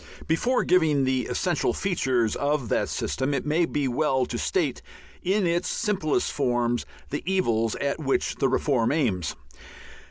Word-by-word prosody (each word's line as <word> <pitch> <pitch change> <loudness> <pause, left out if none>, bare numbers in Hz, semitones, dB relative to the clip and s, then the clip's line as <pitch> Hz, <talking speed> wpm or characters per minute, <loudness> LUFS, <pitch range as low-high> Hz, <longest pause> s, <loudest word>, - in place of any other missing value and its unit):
Before 240 +11 +1
giving 155 -6 +3
the 130 -1 0
essential 175 -4 0
features 130 - 0
of 145 -4 -1
that - - +1
system, 135 +2 -1
it 135 - -2
may 160 +3 +2
be 145 -4 -1
well 130 0 +1
to - - -4
state - - 0 0.4
in 195 +2 +1
its 170 +1 0
simplest 195 -9 0
form 120 -3 +1 0.3
the 145 - -2
evils 115 - +1
at 140 +2 -2
which 135 -3 0
the 135 - +2
reform 130 -3 +1
aims. 110 - 0
140 Hz, 150 wpm, -26 LUFS, 125-165 Hz, 0.4 s, giving